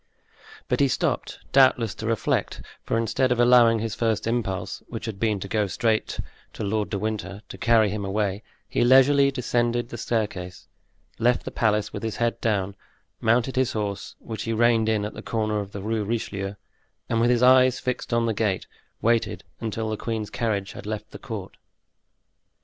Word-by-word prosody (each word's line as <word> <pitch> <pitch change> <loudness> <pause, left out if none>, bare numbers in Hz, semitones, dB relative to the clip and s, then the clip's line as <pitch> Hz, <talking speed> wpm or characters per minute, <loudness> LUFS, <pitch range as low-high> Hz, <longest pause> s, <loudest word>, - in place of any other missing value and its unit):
But - - 0
he 140 - +5
stopped, 130 - -1
doubtless 130 -5 +4
to 110 - -6
reflect; 115 -2 -1 0.2
for - - -1
instead 115 +3 +1
of 125 - +1
allowing 120 -1 +6
his 110 -1 -3
first 110 -2 0
impulse, 110 -6 -2
which - - -6
had 110 -4 -5
been 110 -2 +1
to 100 - -4
go 105 0 0
straight 110 +3 0 0.3
to - - -5
Lord 105 +1 -1
de 100 - -2
Winter, 105 -1 -4
to - - -8
carry 110 -2 +4
him 105 -1 -3
away, 100 0 -1 0.3
he - - +1
leisurely 135 +3 +6
descended 120 -2 0
the 120 - -7
staircase, 100 -6 -3 0.5
left 120 +2 +2
the - - -4
palace 105 -2 +1
with 105 - -5
his 110 -1 -3
head 120 0 -1
down, 100 -3 0 0.4
mounted 120 +3 +2
his 130 -1 +1
horse, 100 -2 -4
which 110 -1 -7
he 115 - -2
reined 115 -1 +3
in 105 -2 +1
at 105 - -5
the - - -8
corner 110 -2 -1
of 100 -1 -6
the 100 -1 -6
Rue 110 0 -1
Richelieu, 100 -2 -3 0.5
and 115 - +1
with 120 - +3
his 125 0 +3
eyes 130 0 +6
fixed 125 0 -3
on 115 0 +2
the 115 - +1
gate, 105 -3 0 0.4
waited 115 0 +1 0.2
until 110 0 -3
the 110 - -2
queen's 110 -2 -3
carriage 105 -4 -1
had - - -9
left 110 0 -5
the - - -9
court. 110 -8 -7
110 Hz, 185 wpm, -25 LUFS, 105-120 Hz, 0.5 s, allowing